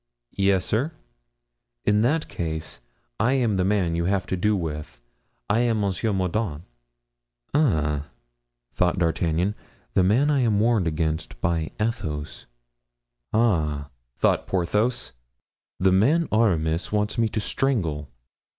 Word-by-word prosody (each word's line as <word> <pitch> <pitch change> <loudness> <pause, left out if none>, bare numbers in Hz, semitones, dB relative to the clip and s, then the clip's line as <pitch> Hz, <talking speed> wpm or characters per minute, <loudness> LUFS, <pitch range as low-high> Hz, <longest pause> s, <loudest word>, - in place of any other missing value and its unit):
"Yes, 95 -2 +3
sir." 135 +10 0 0.9
"In 105 0 +3
that 150 +7 +1
case, 80 -5 -5 0.4
I 125 +4 +3
am 120 -7 +1
the 90 - +2
man 95 -3 +1
you 85 0 0
have 95 0 +1
to - - -2
do 105 +4 +2
with. 75 -8 -5 0.5
I 110 - +2
am 115 -3 +1
M. 100 -1 +1 0.2
Mordaunt." 90 -3 -1 0.9
"Ah!" 75 - +1 0.7
thought 90 +1 +1
D'Artagnan, 85 +2 +1 0.4
"the - - +4
man 120 +11 +3
I 145 - +2
am 110 -5 +2
warned 110 -5 +2
against 80 0 -2
by 85 -2 0
Athos." 80 -10 -3 0.8
"Ah!" 75 - +1 0.3
thought - - +2
Porthos, 105 - 0 0.7
"the 95 0 +4
man 140 - +3
Aramis 85 -7 +1
wants 105 +2 0
me 115 -1 +2
to 110 - -2
strangle." 85 - -1
95 Hz, 125 wpm, -24 LUFS, 80-110 Hz, 0.9 s, the